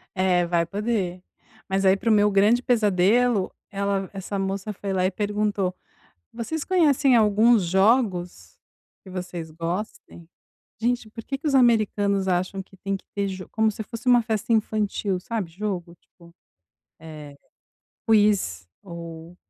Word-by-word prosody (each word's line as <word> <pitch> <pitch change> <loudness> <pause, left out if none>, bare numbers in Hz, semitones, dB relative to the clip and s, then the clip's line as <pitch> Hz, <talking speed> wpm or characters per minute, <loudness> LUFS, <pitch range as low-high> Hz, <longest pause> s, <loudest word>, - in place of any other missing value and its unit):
É 185 -2 +2
vai 170 -1 +1
poder. 195 -2 -2 0.5
Mas 195 +1 0
aí 190 +1 +5
para 230 - -1
o 220 - +5
meu 210 0 +4
grande 205 +4 +3
pesadelo, 215 -1 +2 0.2
ela 200 -1 -1
essa 195 +1 -5
moça 195 +2 -3
foi 200 -1 -5
lá 185 -1 +1
e 185 - +1
perguntou: 205 -2 -1 0.6
"Vocês 265 +7 -4
conhecem 290 -8 +3
alguns 215 0 +4
jogos 185 - +1 0.4
que - - -15
vocês 175 -3 -6
gostem?" 170 +1 -6 0.5
Gente 240 -1 -1
por 230 0 -9
que 275 - -4
que 310 - -7
os 280 - 0
americanos 210 -5 +3
acham 185 +2 -1
que 190 - -20
tem 195 +1 -3
que - - -16
ter 200 0 -1
jo 185 -1 -7
como 220 0 +2
se 215 - -6
fosse 230 +2 -9
uma 245 -1 +6
festa 220 0 -2
infantil 210 -3 0
sabe 210 -3 -4
jogo 180 -2 -4
tipo, 170 -1 -20 0.7
eh, 150 -3 -10 0.7
quiz 205 - +2 0.2
ou 170 -1 -9
200 Hz, 150 wpm, -24 LUFS, 180-220 Hz, 0.7 s, uma